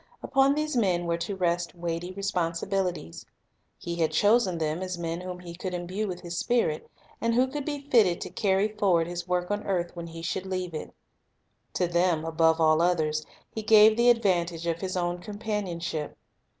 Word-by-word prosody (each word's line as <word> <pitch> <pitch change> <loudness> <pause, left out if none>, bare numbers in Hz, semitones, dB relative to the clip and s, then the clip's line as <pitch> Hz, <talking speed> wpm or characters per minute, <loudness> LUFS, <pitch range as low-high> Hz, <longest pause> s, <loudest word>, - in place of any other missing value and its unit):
Upon 275 +1 +3
these 305 -1 -1
men 185 -7 +2
were 170 0 -1
to 195 +4 -3
rest 175 -2 -1
weighty 170 +1 -3
responsibilities. 180 - -2 0.5
He 170 0 -5
had 160 -2 +2
chosen 205 -4 +3
them 160 +1 -1
as 185 -1 -3
men 170 0 -3
whom 180 0 -6
He 175 -1 -9
could 180 +1 -4
imbue 185 +5 -3
with 180 -2 -5
His 175 0 -6
Spirit, 235 -11 0 0.3
and 230 0 +1
who 250 +2 +4
could 280 +1 -5
be 290 -2 -3
fitted 205 -10 +4
to - - -5
carry 195 0 +2
forward 200 -6 +2
His 175 +1 -5
work 180 +1 -1
on 205 0 0
earth 175 -3 -2
when 170 -1 -6
He 165 0 -9
should 185 +2 -3
leave 185 -2 -3
it. 155 - -6 0.8
To 180 - +1
them, 170 -2 +1
above 165 0 +3
all 155 0 +4
others, 155 -3 +1 0.3
He 220 - -3
gave 215 0 +7
the 240 +1 +4
advantage 175 -7 +1
of 170 0 -1
His 185 -1 -2
own 175 0 -1
companionship. 190 -7 -4
180 Hz, 185 wpm, -27 LUFS, 170-205 Hz, 0.8 s, gave